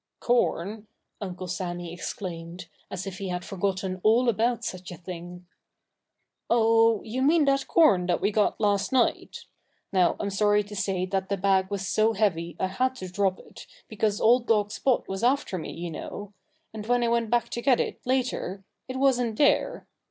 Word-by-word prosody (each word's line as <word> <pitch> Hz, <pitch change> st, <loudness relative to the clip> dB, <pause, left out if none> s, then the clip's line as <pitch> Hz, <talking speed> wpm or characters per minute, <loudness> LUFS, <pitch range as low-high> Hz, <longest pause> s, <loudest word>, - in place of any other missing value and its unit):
"Corn!" 215 Hz, -3 st, 0 dB, 0.3 s
Uncle 185 Hz, -2 st, -5 dB
Sammy 175 Hz, -1 st, -4 dB
exclaimed, 175 Hz, 0 st, -6 dB, 0.2 s
as 190 Hz, 0 st, -5 dB
if 190 Hz, -1 st, -6 dB
he 195 Hz, -, -4 dB
had 180 Hz, -1 st, -4 dB
forgotten 190 Hz, -1 st, -2 dB
all 235 Hz, +4 st, +4 dB
about 235 Hz, +1 st, 0 dB
such 185 Hz, -1 st, -6 dB
a 175 Hz, -, -8 dB
thing. 180 Hz, 0 st, -9 dB, 1.0 s
"Oh! 225 Hz, -1 st, +4 dB
you 235 Hz, +4 st, -3 dB
mean 305 Hz, +3 st, +4 dB
that 275 Hz, -1 st, +1 dB
corn 200 Hz, -, +4 dB
that 175 Hz, -, +1 dB
we 200 Hz, +3 st, +1 dB
got 210 Hz, 0 st, +1 dB
last 200 Hz, -2 st, +1 dB
night. 260 Hz, -2 st, 0 dB, 0.5 s
Now, 185 Hz, -2 st, +3 dB
I'm 200 Hz, -, -2 dB
sorry 205 Hz, +1 st, +3 dB
to 205 Hz, +1 st, -10 dB
say 190 Hz, -2 st, -1 dB
that 190 Hz, 0 st, -2 dB
the 200 Hz, -, 0 dB
bag 190 Hz, 0 st, +2 dB
was 195 Hz, -2 st, -3 dB
so 220 Hz, +3 st, +2 dB
heavy 175 Hz, -6 st, 0 dB
I -, -, +1 dB
had 255 Hz, +8 st, -1 dB
to 185 Hz, -7 st, -7 dB
drop 190 Hz, 0 st, +1 dB
it, -, -, -14 dB, 0.2 s
because 215 Hz, -1 st, -1 dB
old 240 Hz, +2 st, +4 dB
dog 210 Hz, -2 st, +2 dB
Spot 255 Hz, +3 st, 0 dB
was 195 Hz, 0 st, -4 dB
after 250 Hz, -7 st, +1 dB
me, -, -, -6 dB
you 170 Hz, 0 st, -6 dB
know. 205 Hz, +5 st, -7 dB, 0.4 s
And 215 Hz, -1 st, -7 dB
when 245 Hz, 0 st, +2 dB
I -, -, +2 dB
went 230 Hz, -1 st, +1 dB
back 235 Hz, 0 st, +1 dB
to 235 Hz, -, -4 dB
get 255 Hz, -1 st, +3 dB
it, -, -, -2 dB
later, 250 Hz, -7 st, -1 dB, 0.2 s
it 255 Hz, -, -6 dB
wasn't 245 Hz, -5 st, +2 dB
there.... 300 Hz, +11 st, +2 dB
205 Hz, 180 wpm, -26 LUFS, 185-235 Hz, 1.0 s, all